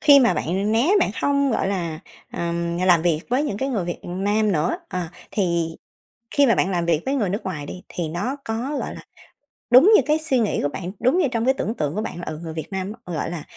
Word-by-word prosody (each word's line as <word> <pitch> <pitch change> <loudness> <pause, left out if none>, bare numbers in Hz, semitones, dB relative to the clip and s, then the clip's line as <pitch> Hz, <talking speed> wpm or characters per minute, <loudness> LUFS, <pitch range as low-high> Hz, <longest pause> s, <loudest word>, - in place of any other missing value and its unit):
khi 285 -2 +8
mà 240 - +4
bạn 195 +6 -1
né, 240 +10 +3
bạn 345 - +2
hông, 280 -1 +2
gọi 220 - 0
là, 170 -5 -3 0.3
ờm, 170 0 -2
làm 180 -3 +4
việc 165 -3 +2
với 255 +4 +2
những 205 - -2
cái 265 +6 -2
người 215 -10 -1
Việt 175 - -4
Nam 205 +4 0
nữa, 160 -1 +1
ờ, 180 -2 -3 0.2
thì 170 -4 0 0.6
khi 285 -1 +4
mà 230 - +4
bạn 190 - +1
làm 170 -2 0
việc 165 -2 +2
với 270 - 0
người 215 -9 0
nước 200 +4 -3
ngoài 155 -6 -4
đi, 180 +5 -8
thì 165 -3 -3
nó 235 - -2
có, 240 +6 -2
gọi - - -4
là, - - -9 0.7
đúng 265 - +8
như - - +7
cái 305 +1 +2
suy 295 -5 +1
nghĩ 220 -3 0
của 145 - +1
bạn? 175 +4 -5
Đúng 255 +8 +3
như 350 -6 +3
trong 230 -1 0
cái 265 - +4
tưởng 225 -4 -2
tượng 150 -5 -2
của 215 - -1
bạn 175 - -5
là, - - -6
ừ, 155 0 -5
người 160 -1 -5
Việt 160 -1 -5
Nam 190 +1 -3
á, 180 - -6
gọi 155 - -2
là, 165 -4 -5
195 Hz, 255 wpm, -23 LUFS, 170-250 Hz, 0.7 s, khi